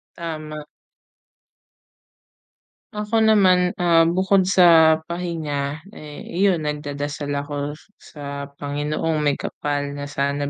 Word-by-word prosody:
Tama. 155 -3 -6 2.3
Ako 210 +2 0
naman, 190 -5 +4
ah, 170 -2 +4
bukod 190 +1 +2
sa 165 -4 +6
pahinga, 155 -5 -3 0.2
eh, 150 -7 -10
iyon, 180 -3 +1
nagdadasal 145 0 -4
ako 145 +1 -4
s - - -21 0.2
sa 140 -1 -8
Panginoong 150 +2 -2
Maykapal 145 0 -2
na 145 0 -6
sana 140 0 -1
155 Hz, 95 wpm, -22 LUFS, 145-175 Hz, 2.3 s, sa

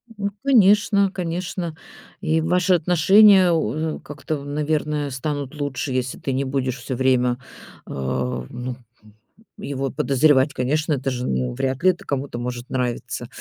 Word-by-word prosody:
Ну 200 -1 -2
конечно, 205 -5 +4
конечно. 175 -1 -4 0.5
И 160 +1 +1
ваши 180 +2 +2
отношения, 185 +3 +6
у 160 -1 -1
как-то, 145 0 -5
наверное, 150 0 -1
станут 140 +2 -4
лучше, 140 -1 -3
если 125 0 -2
ты 135 - -3
не 135 +2 0
будешь 130 -1 -2
всё 130 0 -5
время, 125 -1 +2 0.5
э, - - -9
ну, 65 - -3 0.3
м, 105 -1 -19 0.4
его 135 -1 -3
подозревать. 140 0 +3
Конечно, 150 +5 0
это 135 -1 -1
же, 125 0 -3
ну, 65 -1 -1
вряд 130 - -2
ли 185 - +6
это 180 - -12
кому-то 135 -3 -3
может 120 0 -5
нравиться. 125 -2 -3
145 Hz, 145 wpm, -22 LUFS, 130-165 Hz, 0.5 s, отношения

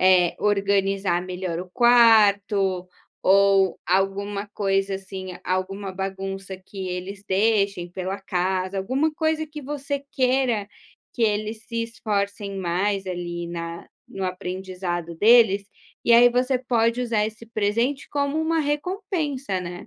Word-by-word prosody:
eh, 185 -2 +5
organizar 195 -3 +1
melhor 180 -2 -4
o 180 0 -9
quarto, 205 -5 +4 0.3
ou 195 -1 +4
alguma 200 +2 0
coisa 195 -1 0
assim, 190 -1 -8 0.2
alguma 190 +1 -2
bagunça 195 0 -5
que 190 0 -7
eles 185 +2 -5
deixem 200 -3 +1
pela 185 +2 -4
casa, 185 0 -1
alguma 265 +11 0
coisa 315 0 0
que 300 -1 -9
você 280 0 -4
queira 255 -5 +1 0.5
que 235 - -2
eles 215 +1 0
se 230 -1 -2
esforcem 205 -3 -3
mais, 190 +2 -1
ali, 175 -1 -4
na 170 0 -6 0.3
no 195 -1 -3
aprendizado 180 -2 -4
deles, 210 +1 +5 0.4
e 235 - +4
aí 240 +1 +8
você 250 +1 +1
pode 235 -1 +1
usar 230 -4 +1
esse 220 +1 -7
presente 230 +5 -1
como 285 +1 -1
uma 320 +1 +1
recompensa, 295 - -2
né. 175 0 -7
200 Hz, 125 wpm, -24 LUFS, 185-235 Hz, 0.5 s, aí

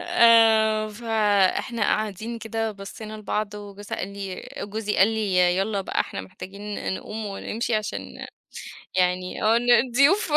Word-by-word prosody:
آآ، 225 -8 +5
فإحنا 215 0 +1
قاعدين 215 +3 -1
كده 225 0 -3
بصّينا 205 +2 -9
لبعض، 210 0 -3
وجوزها 205 0 -7
قال 185 - -3
لي 195 -2 -6
وجوزي 210 +1 -3
قال 190 - +6
لي: 220 -4 -1 0.2
"يالّا 200 +1 0
بقى 190 - -2
إحنا - - -3
محتاجين 195 +2 -6
نقوم 215 +2 -6
ونمشي 220 +3 -3
عشان 215 -1 -4 0.7
يعني 180 0 0
آه، 220 +1 +4
إن 245 +1 +2
الضيوف، 275 - +4
215 Hz, 135 wpm, -24 LUFS, 200-225 Hz, 0.7 s, قال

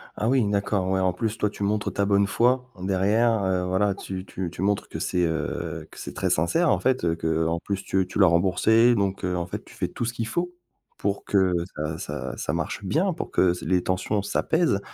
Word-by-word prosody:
Ah 110 - 0
oui, 130 -5 +3
d'accord, 100 -2 0
ouais, 95 - +1
en 95 -1 +2
plus 110 +4 -2
toi 105 - +1
tu 100 - -6
montres 105 +1 0
ta 100 - +1
bonne 100 0 +3
foi. 125 +4 +2
Derrière, 100 +4 +2
heu, 95 -1 0
voilà 95 +2 +2
tu 95 -1 -6
tu 95 -2 -4
tu 85 - -7
montres 100 +1 0
que - - -6
c'est, 90 -1 +1
heu, 80 -1 -3
que - - -12
c'est - - -7
très - - -1
sincère 155 - +2
en - - +3
fait, 130 -4 +1
heu, 85 -1 +1
qu'en 80 0 0
plus 100 +1 -4
tu 95 0 +1
tu 95 - -4
l'as 95 - +7
remboursée 95 +7 +4
donc, 100 -2 -1
heu, 90 -1 0
en 85 -1 -2
fait - - -6
tu - - -15
fais - - -1
tout - - -4
ce 120 - -2
qu'il 115 -2 -3
faut, 175 +8 -2 0.4
pour 100 0 -2
que 95 -2 +3 0.2
ça 75 +1 -3
ça - - -5
ça - - -2
marche - - -3
bien, 170 - +1
pour - - -6
que 90 -2 +3
se 90 - -7
les 90 -1 +2
tensions 95 +3 0
s'apaisent 160 - +1
100 Hz, 235 wpm, -25 LUFS, 90-110 Hz, 0.4 s, l'as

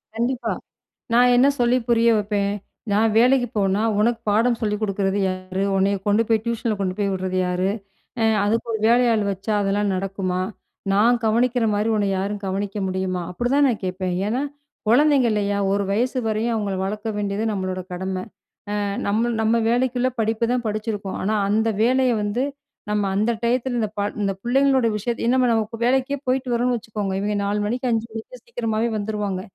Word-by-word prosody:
கண்டிப்பா. 240 +3 -1 0.6
நான் 245 +1 +5
என்ன 255 +3 +5
சொல்லி 240 +1 +3
புரிய 235 0 +4
வப்பேன்! 200 -1 0 0.4
நான் 215 +2 +3
வேலைக்கு 245 +1 +4
போனா, 195 0 +2 0.2
உனக்கு 230 +2 +2
பாடம் 230 +3 +2
சொல்லி 210 -1 0
குடுக்குறது 195 -1 0
யாரு? 185 +1 -3
உன்னைய 195 +1 +2
கொண்டு 205 +2 +4
போய் 225 -2 +2
டியூஷன்ல 230 -1 -1
கொண்டு 190 -2 -1
போய் 200 -1 0
உடுறது 185 0 -2
யாரு? 180 +1 0 0.5
ஆ - - +3 0.2
அதுக்கு 225 +3 0
ஒரு 220 - -1
வேலையாள் 235 -3 +3
வச்சா 195 +3 -3
அதெல்லாம் 200 +1 +1
நடக்குமா? 185 -1 -2 0.5
நான் 230 +5 +4
கவனிக்குற 235 +2 +2
மாரி 210 +2 0
உன்ன 205 - +1
யாரும் 200 +2 -3
கவனிக்க 195 +2 -3
முடியுமா? 185 -1 -2
அப்புடிதான் 245 +9 +2
நான் 235 -5 -1
கேட்பேன். 185 0 -2
ஏன்னா, 240 +5 0 0.5
கொழந்தைங்க 275 +1 +4
இல்லையா? 205 -1 0
ஒரு 200 0 +1
வயசு 250 +5 0
வரையும் 220 +2 0
அவங்கள 205 -3 -2
வளர்த்த 210 +3 -3
வேண்டியது 205 +1 -2
நம்மளோட 185 -2 -3
கடமை. 185 +1 -3 0.6
ஆ - - -1 0.3
நம்மள் 225 +3 +1
நம்ம 225 +1 +2
வேலைக்குள்ள 250 +1 +1
படிப்பு 225 +1 +1
தான் 250 -1 0
படிச்சுருருக்கோம். 210 -2 -3
ஆனா 215 +3 0
அந்த 220 +2 +2
வேலைய 255 +1 +3
வந்து, 205 +5 -1 0.5
நம்ம 210 -1 +1
அந்த 215 +4 +2
டயத்துல 245 +1 0
இந்த 215 -2 0
பாழ் 205 +1 -2
இந்த 195 -1 0
புள்ளைங்களோட 265 0 +3
விஷயத்த 230 +3 -3
ஏன்னா 255 +2 +3
நம்ம 225 -1 +2
இப்ப 230 +1 -8
வேலைக்கே 265 +2 +1
போய்ட்டு 255 0 0
வரோன்னு 245 +1 +1
வச்சுக்கோங்க. 210 -3 -4
இவய்ங்க 205 +1 -1
4 205 +1 0
மணிக்கு, 245 +4 -1
5 225 0 0
மணிக்கு 225 - -8
சீக்கிரமாவே 230 - -1
வந்துருவாங்க. 205 -2 -2
215 Hz, 170 wpm, -22 LUFS, 200-240 Hz, 0.6 s, நான்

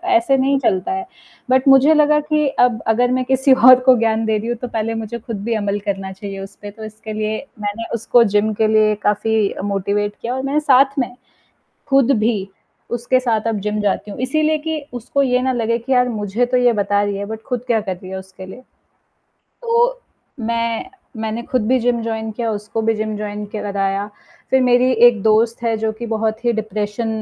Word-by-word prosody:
ऐसे 340 -6 +3
नहीं 275 +1 +2
चलता 190 - 0
है। 380 0 -3 0.4
बट 260 +1 +2
मुझे 270 +3 +6
लगा 300 0 +4
कि, 300 -1 0
अब 245 -4 +1
अगर 245 +3 +2
मैं 255 0 +1
किसी 265 +1 +3
और 255 0 +7
को 255 - +8
ज्ञान 225 -1 +1
दे 220 -1 +1
रही 220 +2 -5
हूँ 240 - -1
तो 250 - -3
पहले 225 -1 -2
मुझे 225 +1 -5
खुद 220 -3 -6
भी 235 - 0
अमल 205 -1 -1
करना 195 -1 -3
चाहिए 195 0 -7
उस 195 0 -9
पे, 205 -1 -10
तो 220 +1 -12
इसके 215 0 -9
लिए 215 0 -2 0.2
मैंने 205 +3 -3
उसको 235 +1 +3
जिम 210 +1 +2
के 215 +1 +1
लिए 215 -1 +3
काफ़ी 210 0 +1
अ, - - -7
मोटिवेट 205 +1 -1
किया 240 +2 -3
और 260 - -2
मैंने 280 +2 0
साथ 275 -1 +3
में, 245 -1 -2 0.7
खुद 275 -1 +3
भी 210 -3 0 0.5
उसके 240 +2 +1
साथ 230 -3 -1
अब 220 - -1
जिम 210 +1 -2
जाती 205 +1 -1
हूँ 200 - -8
इसीलिए 310 +4 +1
कि 315 -1 -2
उसको 245 +4 -1
ये 250 -2 +2
ना 260 0 +1
लगे 230 -1 0
कि 240 +3 -4
यार 250 -1 +3
मुझे 215 +1 -1
तो 250 +1 0
ये 245 -1 +4
बता 205 -1 +1
रही 205 -1 -2
है 200 - -4
बट 220 +1 -7
खुद 250 -3 -3
क्या 230 -3 +2
कर 190 -3 -4
रही 185 +1 -11
है 190 - -5
उसके 190 0 -11
लिए। 190 +7 -11 1.0
तो 480 +1 +1 0.4
मैं 230 +8 -2 0.3
मैंने 220 +1 -3
खुद 235 -2 -1
भी 260 +1 +3
जिम 240 0 +1
जॉइन 220 -1 -3
किया 230 +1 -2
उसको 210 +2 -4
भी 225 0 +1
जिम 215 0 -3
जॉइन 210 0 -5
के 215 - -4
लगाया। 200 0 -1 0.4
फिर 265 - +4
मेरी 250 0 +3 0.2
एक 235 -3 +4
दोस्त 225 +2 +2
है 230 -1 0
जो 220 0 -1
कि 230 +2 -7
बहुत 220 0 -2
ही 240 - +3
डिप्रेशन 215 +1 -3
225 Hz, 215 wpm, -19 LUFS, 210-255 Hz, 1.0 s, को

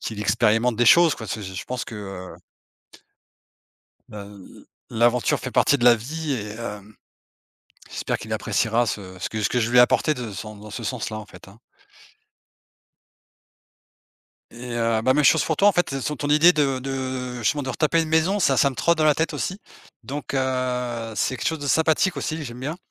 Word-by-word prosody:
qu'il 110 -2 -5
expérimente 110 +3 +2
des 120 - +2
choses 170 +5 +6
quoi, 110 - -8
c'est 105 +1 -5
c'est 95 -1 -8
je 95 - -5
pense 125 -1 -4
que, - - -9
heu 95 -3 -8 1.8
heu, 105 - -8
l 100 -1 -12
l - - -19 0.4
l'aventure 120 +1 +2
fait - - -5
partie 145 - +3
de - - -2
la 120 -1 +7
vie 150 +6 -4
et 105 -5 -4
hem, 105 -2 -8 0.9
j'espère - - -3
qu'il - - -9
appréciera 115 +2 0
ce 95 -4 -5
ce - - -3
que 110 - -4
ce - - +1
que 125 - 0
je 115 0 -1
lui 125 - +4
ai - - +9
apporté 155 +5 +3
de 125 -6 -6
sans 105 +3 -8
dans 105 +1 -12
ce 115 +3 -7
sens-là 110 -2 -4
en 110 - -8
fait, 90 -2 -15
hein. 100 +4 -16 2.9
Et 120 +1 -8
heu, 115 -1 +1
bah, 130 +3 +3
même 150 +2 +2
chose 155 +3 +5
pour 160 - -1
toi 200 - +5
en - - +6
fait, 175 -5 0
elle 135 0 -3
son 150 - -2
ton 145 +1 -4
idée 155 +4 +6
de 140 -3 +1
de 130 -1 -4
justement 140 +6 0
de 130 - -5
retaper 160 +4 +1
une 160 - -4
maison, 165 +6 +2
ça 135 -8 +2
ça 140 - +4
me 130 - -9
trotte 170 +6 +2
dans - - +3
la 150 -1 +4
tête 160 +3 -1
aussi. 190 - -3 0.5
Donc 140 +4 -5
heu, 125 -3 -2
c'est 130 - 0
quelque 115 - -3
chose 160 - -1
de 145 - -6
sympathique 160 +5 +2
aussi, 155 0 -3
j'aime 120 -2 -8
bien. 145 +5 -4
125 Hz, 210 wpm, -23 LUFS, 110-150 Hz, 2.9 s, ai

